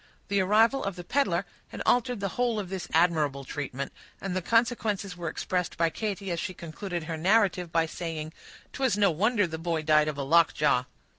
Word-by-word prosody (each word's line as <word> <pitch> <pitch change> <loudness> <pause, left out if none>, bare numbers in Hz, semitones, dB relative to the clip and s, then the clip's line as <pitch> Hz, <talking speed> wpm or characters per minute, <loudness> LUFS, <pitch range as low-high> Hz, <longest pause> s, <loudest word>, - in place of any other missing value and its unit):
The 200 -1 +2
arrival 220 +7 +3
of 195 -2 -3
the 175 - -7
peddler 195 -6 +1 0.2
had - - -6
altered 245 -3 +2
the 195 - -1
whole 240 +1 0
of 195 -3 -5
this 190 -1 -4
admirable 155 -5 +2
treatment; 140 -1 -5 0.3
and 195 -2 -4
the 185 - 0
consequences 220 -3 +1
were 170 -2 -4
expressed 180 +1 -2
by 165 -1 +2
Katy, 200 -1 -3
as 170 - -1
she 185 0 -4
concluded 170 +1 -5
her 160 0 -4
narrative, 185 -1 +2
by 165 0 +2
saying,— 160 -1 -5 0.4
"'Twas 260 -6 +1
no 200 -3 +4
wonder 205 +5 +2
the 160 -2 -5
boy 165 -1 -1
died 150 0 +4
of 150 -2 -3
a 140 - -2
lockjaw!" 150 -4 +3
180 Hz, 195 wpm, -28 LUFS, 160-205 Hz, 0.4 s, no